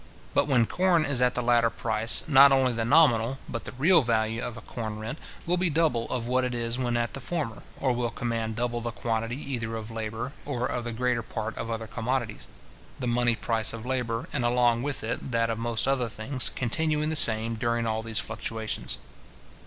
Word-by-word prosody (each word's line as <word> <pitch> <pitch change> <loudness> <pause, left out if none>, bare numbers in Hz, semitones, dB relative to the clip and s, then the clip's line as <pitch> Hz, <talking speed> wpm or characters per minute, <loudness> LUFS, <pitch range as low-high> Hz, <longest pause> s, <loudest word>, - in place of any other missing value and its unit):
But - - +3
when 125 -5 +4
corn 175 +2 +2
is 140 -3 0
at 125 0 +3
the 125 - 0
latter 120 -1 +4
price, 115 0 -1
not 140 -1 +8
only 130 -2 +3
the 115 0 -1
nominal, 130 -2 +4
but 115 - -5
the - - -5
real 160 +7 +5
value 115 -2 0
of 120 - -5
a - - -8
corn 110 -1 -5
rent, 110 +7 -5 0.3
will 175 +1 +1
be 180 0 +1
double 150 -7 +1
of 120 -2 -2
what 130 +1 +1
it 125 -1 -1
is 120 +1 -1
when 120 -2 0
at 120 0 -1
the - - -4
former, 135 -6 -3 0.2
or 130 -2 +2
will 120 -1 -1
command 115 -1 -2
double 120 0 -1
the 120 - -2
quantity 115 +1 -2
either 115 -6 -3
of 110 0 -6
labour, 110 +3 -4
or 125 -4 -2
of 120 -1 -2
the 120 - -3
greater 125 +1 0
part 110 0 -5
of 115 - -5
other 115 -1 -3
commodities; 115 +1 -2 0.5
the 130 - -4
money 120 0 +2
price 110 -1 0
of 115 0 -7
labour, 125 -3 -2
and 125 - 0
along 120 -1 +3
with 140 -2 -3
it 115 +4 -3
that 115 -1 +1
of 115 - -3
most 115 -1 0
other 130 -3 +1
things, 120 +5 -1
continuing 150 +5 0
the - - -1
same 115 -4 +3
during 115 +1 0
all 110 0 0
these 110 -1 -4
fluctuations. 110 -1 -3
120 Hz, 210 wpm, -27 LUFS, 115-130 Hz, 0.5 s, not